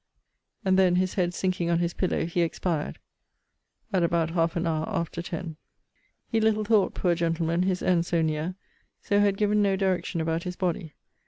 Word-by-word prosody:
And 190 0 +4
then, 180 -2 +4
his 185 0 +1
head 175 -2 +1
sinking 180 -2 -1
on 170 - +3
his 170 0 0
pillow, 185 -3 0
he 170 +1 -1
expired, 165 -1 -1 1.0
at 185 - +3
about 170 -1 +1
half 165 -1 +1
an 170 0 -1
hour 160 -1 -1
after 170 -4 -2
ten. 170 -2 -6 0.7
He 225 -2 0
little 215 -1 +2
thought, 210 -2 +3
poor 175 -2 +2
gentleman! 165 0 0
his 185 0 0
end 175 -2 +2
so 170 -2 +1
near: 155 +3 -1 0.4
so 205 - +1
had 200 -1 +3
given 210 0 +2
no 200 -1 +3
direction 190 -2 -1
about 165 +1 -1
his 180 0 -5
body. 175 -4 -2
175 Hz, 180 wpm, -27 LUFS, 165-190 Hz, 1.0 s, And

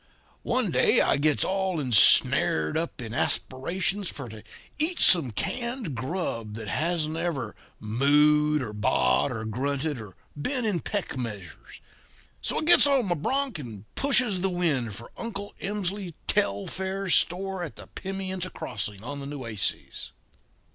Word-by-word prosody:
One - - 0
day - - +4
I - - +3
gets 150 +1 +3
all 190 -3 0
ensnared 105 - +5
up 165 -2 -2
in 110 -1 -6
aspirations 175 +11 0
for 135 -4 -7
to 110 -1 -10 0.4
eat 335 +4 +1
some 165 -8 +6
canned 235 - -3
grub 120 - -3
that 110 -1 -7
hasn't 160 - -1
ever 155 -10 -3 0.2
mooed 150 +6 +3
or 105 -3 -6
baaed 65 - +2
or 115 -3 -4
grunted 135 +4 -2
or 105 -4 -11 0.2
been 245 - -1
in 200 -5 +1
peck 200 -5 -3
measures. 105 -8 -8 0.6
So, - - -1
I - - -3
gets 340 -2 +6
on 265 -8 +2
my - - +3
bronc 265 - -1
and 110 -7 -9
pushes 255 -9 +2
the 190 - +1
wind 145 - -1
for 115 - -11
Uncle 205 -3 -5
Emsley 195 -3 -3
Telfair's 190 - 0
store 190 +1 +1
at 165 - -7
the - - -11
Pimienta 190 -1 -5
Crossing 105 - -5
on 145 +3 -5
the 140 - -6
Nueces. 120 -8 -4
155 Hz, 145 wpm, -26 LUFS, 115-190 Hz, 0.6 s, some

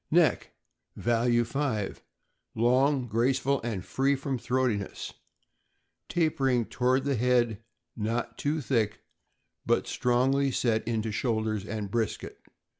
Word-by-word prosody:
Neck - - +3 0.5
(value 120 0 +2
5) 115 -5 -2 0.5
long, 130 +3 +3
graceful, 130 +4 +1
and 110 -6 -4
free 135 +1 +1
from 135 -1 -3
throatiness, 125 -5 -1 1.0
tapering 135 -8 +1
toward 130 +3 +1
the 140 0 0
head; 120 -2 +2 0.3
not 115 +2 -2
too 150 +2 -1
thick, 115 -5 0 0.6
but - - +1
strongly 135 +3 +2
set 115 -3 0
into 110 -1 -1
shoulders 110 -2 -1
and 105 -2 -4
brisket. 115 -1 -2
120 Hz, 110 wpm, -28 LUFS, 110-135 Hz, 1.0 s, Neck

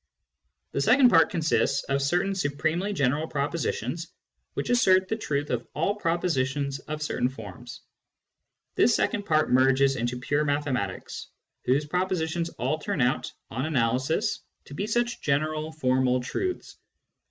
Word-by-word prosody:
The 140 - -1
second 250 - +6
part 165 -5 +5
consists 155 -4 +1
of 140 0 -1
certain 180 +8 +1
supremely 160 +3 -1
general 145 -2 0
propositions, 165 +3 -2 0.5
which - - -2
assert 185 -6 +4
the 220 - -1
truth 145 -9 -2
of 120 -1 -2
all 165 +7 +1
propositions 145 -7 -1
of 155 +3 -5
certain 125 -4 0
forms. 110 -7 -10 0.9
This - - +4
second 205 - 0
part 155 -1 +2
merges 135 +1 +4
into 120 +1 -2
pure 145 +4 0
mathematics, 140 -9 -2 0.4
whose 140 +4 +2
propositions 170 0 -1
all 135 +6 -1
turn 150 - -3
out, 125 +1 +1 0.2
on 130 +6 -2
analysis, 135 - 0 0.3
to - - -11
be 195 +8 -3
such 240 +2 0
general 155 +2 0
formal 130 -4 +1
truths. 365 - -4
150 Hz, 135 wpm, -26 LUFS, 135-175 Hz, 0.9 s, second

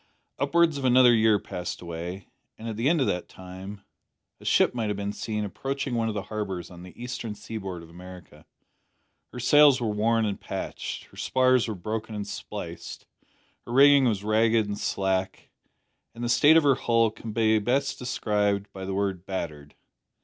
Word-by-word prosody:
Upwards 170 -4 +2
of - - -6
another 125 -1 +6
year 110 -2 +4
passed 90 -3 -6
away, 85 +2 -7 0.3
and 115 - -8
at 110 - -4
the 115 +6 +1
end 165 -3 +2
of - - +3
that 90 -5 -2
time 95 +2 -10 0.6
a - - -15
ship - - +3
might 115 -3 -2
have 105 -1 -2
been 100 0 -3
seen 105 -1 -3
approaching 135 +6 -4
one 115 -1 0
of 110 - -3
the 100 - -3
harbours 95 -5 -5
on 90 -1 -11
the 90 +3 -13
eastern 120 -3 -5
seaboard 95 -6 -7
of 80 - -14
America. 90 0 -13 0.8
Her 125 - -8
sails 140 +2 +6
were 115 -3 -1
worn 110 +2 +1
and 100 -2 -3
patched. - - -5
Her - - -19
spars 130 -2 +2
were 110 - -3
broken 110 +4 -5
and 105 -1 -4
spliced. 100 - -7 0.6
Her 120 - -5
rigging 140 +1 +7
was 105 -5 0
ragged 110 +1 +3
and 100 0 -4
slack, 95 -1 -2 0.6
and 120 - -7
the 120 - -1
state 150 +6 +6
of 165 - +4
her 140 -1 +5
hull 115 -3 +2
can 110 0 -8
be 110 0 +3
best 130 +6 0
described 105 -5 -1
by 95 -1 -7
the 95 0 -3
word 95 -3 -1
`battered.' 75 -6 -5
110 Hz, 185 wpm, -26 LUFS, 95-120 Hz, 0.8 s, rigging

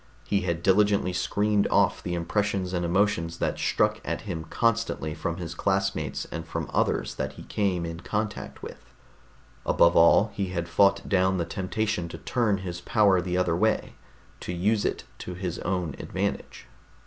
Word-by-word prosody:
He 100 -1 +1
had 85 -2 -2
diligently 100 -1 +3
screened 105 +3 +1
off - - +2
the 90 - -3
impressions 95 +2 -1
and 90 -1 0
emotions 85 -2 +1
that - - -1
struck - - +1
at - - -3
him 80 -2 -5
constantly 115 -5 0
from 85 +1 -3
his 85 -3 -5
classmates 95 +2 -1
and 85 0 -4
from 80 - -5
others - - +1
that - - -4
he - - -11
came 95 -5 -1
in 85 0 -5
contact 105 +3 -4
with. - - -8 0.8
Above 85 0 +4
all, 90 +6 +6
he 100 -1 -2
had 85 -2 -3
fought 100 +3 +3
down 95 -1 +2
the 85 - -1
temptation 95 +1 -2
to - - -7
turn 115 -5 0
his 85 -1 -5
power 100 -2 +3
the 90 0 -2
other 90 -2 +2
way, 110 +5 +1 0.5
to - - -5
use 100 +5 +1
it - - -1 0.2
to 90 - -6
his 90 -2 -4
own 90 -5 -2
advantage. - - -3
95 Hz, 170 wpm, -26 LUFS, 85-100 Hz, 0.8 s, all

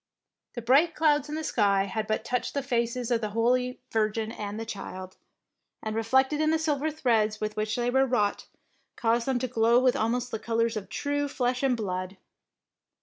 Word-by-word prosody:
The 240 - -5
bright 285 +8 +4
clouds 295 -2 +2
in 300 - -3
the 315 - -3
sky 200 -8 +2
had 215 +2 -3
but 215 +1 -1
touched 250 +3 -2
the 280 - 0
faces 240 -1 -1
of 235 -1 +2
the 215 - -2
Holy 250 +2 +1
Virgin 220 0 0
and 210 -1 -5
the 225 - -4
Child, 185 -3 -7 0.7
and 220 0 -3
reflected 265 +6 +2
in 310 - +2
the 320 - +3
silver 310 -1 0
threads 225 -8 +1
with 215 0 -3
which 215 0 -1
they 245 0 0
were 265 +1 +3
wrought, 210 -5 0 0.5
caused 235 +1 +1
them 265 -2 +1
to 255 +1 -1
glow 230 0 +3
with 255 -1 +3
almost 245 +3 -1
the 220 - -3
colours 230 0 0
of 210 -2 -5
true 290 0 -1
flesh 250 -2 -1
and 265 -3 +2
blood. 185 -2 -4
235 Hz, 195 wpm, -27 LUFS, 215-265 Hz, 0.7 s, bright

